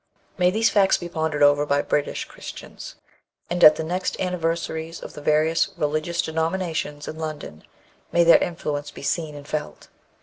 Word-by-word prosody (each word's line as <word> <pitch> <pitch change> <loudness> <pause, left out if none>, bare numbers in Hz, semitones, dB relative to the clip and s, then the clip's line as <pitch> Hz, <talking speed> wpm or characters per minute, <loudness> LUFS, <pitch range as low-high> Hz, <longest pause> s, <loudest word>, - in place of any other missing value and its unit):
May 180 -1 +3
these 220 +4 +2
facts 195 -2 +4
be 175 - -6
pondered 160 -3 -1
over 145 0 +5
by 145 -1 +1
British 145 - -1
Christians, - - -10 0.6
and 175 0 0
at 155 - +10
the 160 - -3
next 180 +3 -2
anniversaries 165 -2 -2
of - - -9
the 150 - -9
various 155 +2 +2
religious 155 +3 -1
denominations 160 -2 -2
in 155 - -6
London 155 - -6 0.5
may 170 - +4
their 170 0 +7
influence 145 -4 -3
be 145 - -11
seen 155 0 -2
and 145 0 -10
felt! 150 -1 -5
160 Hz, 165 wpm, -23 LUFS, 150-170 Hz, 0.6 s, at